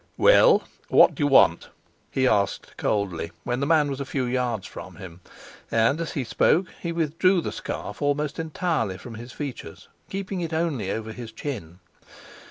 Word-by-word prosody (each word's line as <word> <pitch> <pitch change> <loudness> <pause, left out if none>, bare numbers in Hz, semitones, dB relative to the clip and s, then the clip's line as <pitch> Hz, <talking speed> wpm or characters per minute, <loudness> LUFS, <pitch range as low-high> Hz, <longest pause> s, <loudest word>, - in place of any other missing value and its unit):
"Well, - - +6 0.3
what - - +6
do - - -7
you 145 - +3
want?" 135 - +5 0.4
he 130 -1 +1
asked 100 -4 0
coldly, 95 -5 -1
when 120 0 -2
the 140 - 0
man 155 -2 +4
was 135 -1 -4
a - - 0
few 135 -1 -2
yards 120 -5 -1
from - - -9
him; 90 -1 -11 0.5
and, 115 +8 +2
as 165 - -4
he 135 - -1
spoke, 170 +9 +2 0.2
he 170 - -2
withdrew 170 +3 +2
the - - -3
scarf - - -6
almost 145 +1 0
entirely 155 - -1
from 120 +5 -10
his 120 +2 -9
features, 140 -2 -7 0.2
keeping 195 -1 -4
it 165 -1 -4
only 160 - -1
over 110 +1 -3
his 115 -1 -8
chin. 105 - -6
135 Hz, 175 wpm, -25 LUFS, 110-160 Hz, 0.5 s, Well